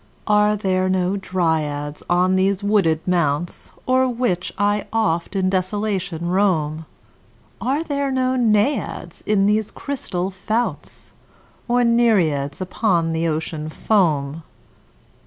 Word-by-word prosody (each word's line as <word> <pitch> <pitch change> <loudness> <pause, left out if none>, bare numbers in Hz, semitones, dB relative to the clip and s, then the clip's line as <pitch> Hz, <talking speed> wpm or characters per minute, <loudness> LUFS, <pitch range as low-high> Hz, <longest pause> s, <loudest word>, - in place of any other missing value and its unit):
Are 210 0 +3
there 185 -2 0
no 185 +1 +1
Dryads 160 -6 -1
on 180 +1 +3
these 195 +1 +1
wooded 190 -7 +1
mounts 170 -2 -1 0.2
O'er 260 0 +3
which 230 -7 -1
I 205 0 +1
oft 210 -5 0
in 190 -1 +1
desolation 185 -2 -1
roam? 160 -5 0 0.7
Are 275 +6 0
there 280 -3 -1
no 260 -1 +1
Naiads 215 - 0
in 205 -2 +3
these 210 +1 +1
crystal 195 -10 -4
founts? 220 +5 -3 0.6
Nor 245 0 +3
Nereids 190 -13 +2
upon 180 -3 0
the 165 +1 0
Ocean 155 0 -3
foam? 155 -6 +1
190 Hz, 115 wpm, -21 LUFS, 165-215 Hz, 0.7 s, Are